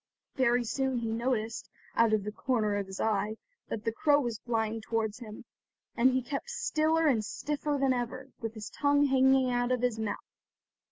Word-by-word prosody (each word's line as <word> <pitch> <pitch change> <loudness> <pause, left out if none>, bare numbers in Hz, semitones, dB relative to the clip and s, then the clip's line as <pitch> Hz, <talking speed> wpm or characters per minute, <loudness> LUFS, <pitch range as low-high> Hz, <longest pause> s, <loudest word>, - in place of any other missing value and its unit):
Very 245 -2 +2
soon 265 +2 -1
he 230 -1 -2
noticed, 230 -1 -2 0.3
out 230 -1 +4
of 215 -2 +2
the 210 - -4
corner 215 -2 0
of 200 -1 -2
his 190 0 -8
eye, 215 0 0 0.3
that 220 +1 -4
the 225 - +1
crow 290 +5 +3
was 240 -5 -2
flying 225 -2 -1
towards 220 0 -2
him, 215 -3 -9 0.5
and 250 +2 +5
he 260 0 0
kept 280 - -4
stiller 325 -9 +1
and 245 -8 +3
stiffer 295 +6 -2
than 270 -1 +3
ever, 255 +2 -4
with 225 -1 -5
his 215 -1 -7
tongue 285 0 +3
hanging 265 -1 +4
out 245 0 0
of 250 -1 0
his 240 -3 +1
mouth. 215 -2 -3
240 Hz, 185 wpm, -30 LUFS, 220-265 Hz, 0.5 s, and